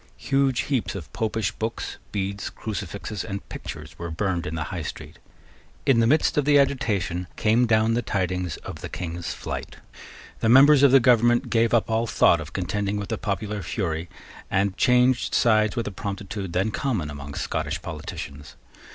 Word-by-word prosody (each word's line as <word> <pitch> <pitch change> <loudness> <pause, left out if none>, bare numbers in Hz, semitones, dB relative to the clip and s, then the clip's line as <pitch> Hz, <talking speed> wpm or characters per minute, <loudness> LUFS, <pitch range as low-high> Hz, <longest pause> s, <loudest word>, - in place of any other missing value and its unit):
Huge 135 -2 +1
heaps 120 -11 -1
of 75 -10 -8
Popish 110 -3 -1
books, 110 +1 -4
beads, 100 0 -3
crucifixes, 100 -1 -5
and 100 -2 -6
pictures - - -8
were 85 0 -4
burned 90 +1 -1
in 80 - -4
the 80 - -2
High 90 - -3
Street. 80 - -8 0.7
In 135 -5 +4
the 115 - +4
midst 150 +2 +3
of 145 - 0
the 145 0 +5
agitation 105 -10 0
came 115 +3 +3
down 110 0 +3
the 120 - +1
tidings 90 -6 -2
of - - -7
the - - -6
King's 85 -1 -5
flight. - - -6 0.6
The 110 - +1
members 135 +3 +8
of 140 - +7
the 135 - +8
government 120 -1 +3
gave 115 -1 +3
up 115 -2 +3
all 115 +1 0
thought 85 -5 +4
of 75 0 -8
contending 100 +2 -2
with 100 -1 -5
the - - -1
popular 105 0 -3
fury, 85 -3 -3 0.4
and 95 0 +1
changed 125 +2 +3
sides 110 -2 +3
with 115 -2 -1
a - - -3
promptitude 100 -1 -5
then 95 +4 +1
common 105 - -2
among 70 0 -8
Scottish - - -2
politicians. 70 0 -7
105 Hz, 175 wpm, -25 LUFS, 90-120 Hz, 0.7 s, members